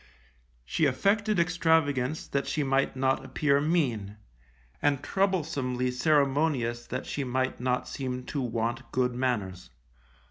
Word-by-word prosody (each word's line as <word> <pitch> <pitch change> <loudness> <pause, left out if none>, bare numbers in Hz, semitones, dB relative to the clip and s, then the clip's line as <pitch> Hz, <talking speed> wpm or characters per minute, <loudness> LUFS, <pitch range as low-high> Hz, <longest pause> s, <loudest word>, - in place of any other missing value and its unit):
She 155 - +1
affected 205 - +1
extravagance 160 -5 +1
that 140 0 -1
she 150 - 0
might 135 0 +1
not 135 0 +1
appear 140 +1 +1
mean, 125 - 0 0.6
and 145 -1 +1
troublesomely 145 -11 0
ceremonious 135 -3 +1
that 125 +1 -4
she 145 - -3
might 130 0 -1
not 125 0 0
seem 125 -2 -4
to 140 +2 -3
want 120 +1 -2
good 125 -1 +1
manners. 115 -8 -2
135 Hz, 120 wpm, -28 LUFS, 125-150 Hz, 0.6 s, She